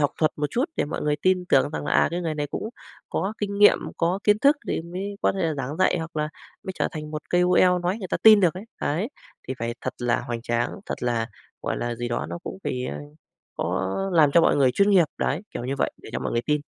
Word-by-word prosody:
học 145 - +3
thuật 155 -2 +2
một 150 0 0
chút 250 +4 +1
để - - +1
mọi 150 - -4
người 150 0 +1
tin 185 +3 +1
tưởng 135 +2 +4
rằng 150 - -4
là, - - -1
à, - - +4
"Cái 175 +1 -2
người 165 -3 -2
này 145 -1 -2
cũng 215 - -4 0.4
có 195 - -1
kinh 200 -1 -2
nghiệm, 205 - +7 0.2
có 175 +3 +1
kiến 210 0 +4
thức 285 +4 +5
thì - - 0
mới 190 +4 -5
có - - +3
thể 195 - -3
là 160 -2 0
giảng 140 +2 -4
dạy, 185 -1 +3
hoặc 160 0 -6
là 150 0 0 0.3
mới 190 - -5
trở - - 0
thành 155 -2 -6
một 150 0 -5
KOL" 180 0 +4
nói 180 +4 -1
người 190 -5 -6
ta - - 0
tin 215 -2 +9
được 180 -2 +3
ấy. 190 +4 -7 0.2
Đấy. 175 - -1 0.4
Thì 130 - -2
phải 115 +1 -3
thật - - -4
là 120 -1 +1
hoành 120 -1 -5
tráng, 120 0 0 0.2
thật - - -5
là, 115 -2 0 0.4
gọi - - -2
là, 120 0 -2
gì 120 +1 -4
đó 120 - -2
nó - - -4
cũng - - -6
phải, 125 0 -2
a, 75 - -4 0.6
có 95 0 -1 0.2
làm 155 -4 +5
cho 170 - +6
mọi - - +4
người 135 -3 +4
chuyên 200 +10 +3
nghiệp. 185 -4 +6
Đấy, 150 +6 -1
kiểu 120 - -5
như 135 +2 -2
vậy - - +1
để - - -12
cho - - -1
mọi - - -3
người 115 - +1
tin. 150 +2 0
160 Hz, 270 wpm, -25 LUFS, 135-185 Hz, 0.6 s, tin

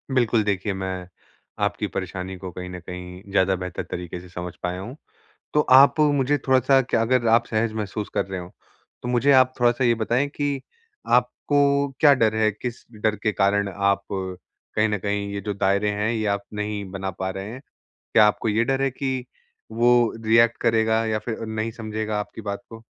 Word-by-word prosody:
बिल्कुल, 115 -3 +3
देखिए 100 0 -1
मैं 95 -1 -4 0.6
आपकी - - 0
परेशानी 95 0 -5
को 90 0 -7
कहीं 90 +1 -7
न 90 0 -7
कहीं 90 +1 -9
ज़्यादा 95 -1 +3
बेहतर 90 -1 -5
तरीके 90 0 -5
से 90 - -14
समझ 90 0 -6
पाया 90 0 -2
हूँ। 120 +7 -7 0.6
तो 150 - +5 0.2
आप 140 +3 +6
मुझे 145 -1 +3
थोड़ा-सा 130 +1 +4
क्या 125 - 0
अगर 120 +1 +2
आप 115 +1 +4
सहज 110 0 0
महसूस 105 -1 -4
कर - - +1
रहे 95 -1 -5
हों, 90 0 -9 0.5
तो 125 - -4
मुझे 125 +3 +3
आप 130 -1 +5
थोड़ा-सा 120 +1 +3
ये 120 -1 +4
बताएँ 120 +5 0
कि 145 -1 -2 0.6
आपको 140 -1 +1
क्या 150 -2 +7
डर 110 -4 +2
है, 110 -1 +3
किस 120 +3 -6 0.2
डर 110 -1 +2
के 110 - +1
कारण 100 0 +2
आप 100 0 +1
कहीं 95 +3 -3
न 105 -1 -1
कहीं 100 +1 -2
ये 100 - -3
जो 105 - -1
दायरे 100 +1 +1
हैं, 105 +1 -1
ये 110 -2 -1
आप 100 0 -6
नहीं 105 0 -3
बना 95 0 -4
पा 95 +1 -4
रहे 95 +2 -6
हैं? 130 - -8 0.5
क्या 110 - +7
आपको 105 +1 0
ये 110 +2 +2
डर 135 +2 0
है 135 - +2
कि 130 -1 -3 0.5
वो 120 0 +3
रिएक्ट 115 +1 +4
करेगा 110 -1 +2
या 110 -1 0
फिर 110 +1 -4
अ, - - -3
नहीं 110 +1 -3
समझेगा 110 -1 -3
आपकी 105 +2 -6
बात 100 +2 -5
को? 115 0 -11
110 Hz, 195 wpm, -24 LUFS, 95-120 Hz, 0.6 s, क्या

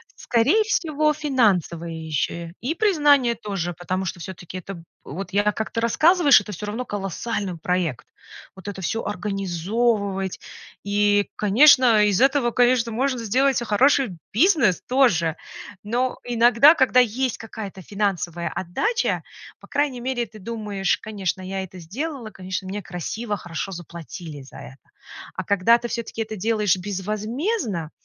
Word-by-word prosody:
Скорее 265 - +2
всего, 310 -8 +1
финансовая 210 - +1
ещё 160 +1 -3
и 275 +7 -2
признание 290 - +3
тоже, 195 -6 -4
потому 185 +2 -3
что 180 - -4
всё-таки 180 +1 -8
это 180 -1 -9 0.2
вот 180 +5 -7
я 205 +1 +3
как 220 +1 -4
ты 230 - -2
рассказываешь, 300 - +5
это 210 - -8
всё 205 +2 -6
равно 225 +5 -4
колоссальный 200 -1 -4
проект. 170 -4 -2 0.5
Вот 190 0 -12
это 200 -2 -5
всё 225 +5 -2
организовывать- 195 +1 -1 0.4
и, 205 0 +2
конечно, 235 0 +6
из 205 0 +2
этого, 270 -2 +3
конечно, 245 -1 +3
можно 255 +2 0
сделать, 255 +4 +1
а, - - -6
хороший 245 -2 +2
бизнес 255 - +3
тоже. 210 - +2 0.5
Но 245 +4 -1
иногда, 240 +5 +5
когда 260 -4 +4
есть 250 +1 +1
какая-то 215 -4 -8
финансовая 180 -4 -2
отдача, 425 - -1 0.4
по - - -16
крайней 285 -3 -1
мере 245 -1 -1
ты 215 - -14
думаешь: 205 -2 -2
"Конечно, 195 -4 -3
я 190 +1 -4
это 185 0 -10
сделала, 245 - -5
конечно, 185 -2 -6
мне 205 +2 -4
красиво, 205 +5 -4
хорошо 175 +2 -5
заплатили 170 -3 -8
за 135 - -13
это." 135 +1 -13 0.5
А - - -3
когда 200 +4 +4
ты 240 - -4
всё-таки 235 -1 -4
это 220 0 -4
делаешь 210 -2 +1
безвозмездно, 210 - -3
210 Hz, 140 wpm, -23 LUFS, 185-245 Hz, 0.5 s, конечно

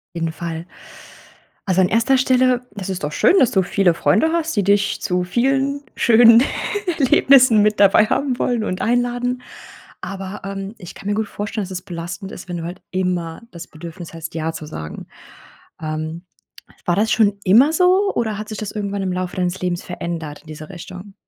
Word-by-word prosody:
Jeden 165 -1 -2
Fall. 165 0 -6 1.0
Also 190 -1 +3
an 180 - +3
1. 230 +4 +3
Stelle. 255 -1 +3
Das 195 -3 -6
ist 185 -5 -4
doch 150 - -3
schön, - - +4
dass 250 - +4
du 190 - +2
viele 180 -1 +2
Freunde 320 - +2
hast, 330 -5 -1
die 200 - +2
dich 200 0 +1
zu 180 -1 0
vielen 270 +8 0
schönen 230 +1 +7 0.6
Erlebnissen 260 -4 +5
mit 210 0 +2
dabei 205 +2 +6
haben 260 +1 -1
wollen 240 -3 0
und 185 -3 -3
einladen. 245 +1 0 0.6
Aber, 195 0 -6
ähm, 195 +1 -5
ich 175 -4 -10
kann 200 - -8
mir 205 - +1
gut 215 0 -2
vorstellen, 210 +1 -4
dass 190 - -7
das 180 -1 -5
belastend 185 +2 -7
ist, 180 - -10
wenn 175 - -4
du 165 - -5
halt 175 +2 -7
immer 180 -1 -2
das 170 -5 -9
Bedürfnis 165 +1 -10
hast, 165 -1 -7
ja 160 0 -2
zu 155 - -8
sagen. 80 - -8 0.7
Ähm, 155 +2 -5 0.6
war 175 - +2
das 215 +2 +1
schon 205 -3 +3
immer 240 +11 +5
so, 370 +4 +3
oder 220 -3 -1
hat 215 +1 -6
sich 215 - -6
das 215 - -5
irgendwann 200 -1 -3
im 185 -1 -1
Laufe 180 0 -4
deines 180 0 -1
Lebens 180 -1 -2
verändert 170 -4 -6
diese 155 0 -9
Richtung? 185 +2 -10
195 Hz, 185 wpm, -20 LUFS, 175-230 Hz, 1.0 s, schönen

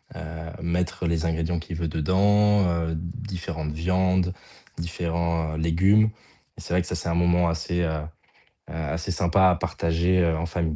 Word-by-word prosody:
heu - - -7
heu, 80 +1 -7
mettre 85 +1 -1
les 85 -1 0
ingrédients 80 +1 -1
qu'il 85 +1 -7
veut 85 0 -1
dedans, 100 +6 +3
heu, 85 -1 -1
différentes 85 -3 -5
viandes, 90 +3 +1 0.4
différents 85 -1 -2
légumes. 95 +7 +3 0.5
C'est - - -5
vrai 90 - +4
que - - -9
ça, - - -3
c'est 85 +1 -3
un 85 - 0
moment 85 0 +3
assez, 85 +1 -1
heu, 85 - +1 0.8
a 80 -3 -4
assez 85 +3 -3
sympa 95 +2 +4
à - - +2
partager, 85 +3 0
heu, 85 -2 +2
en 80 - -2
famille. 85 -2 -2
85 Hz, 165 wpm, -25 LUFS, 80-90 Hz, 0.8 s, vrai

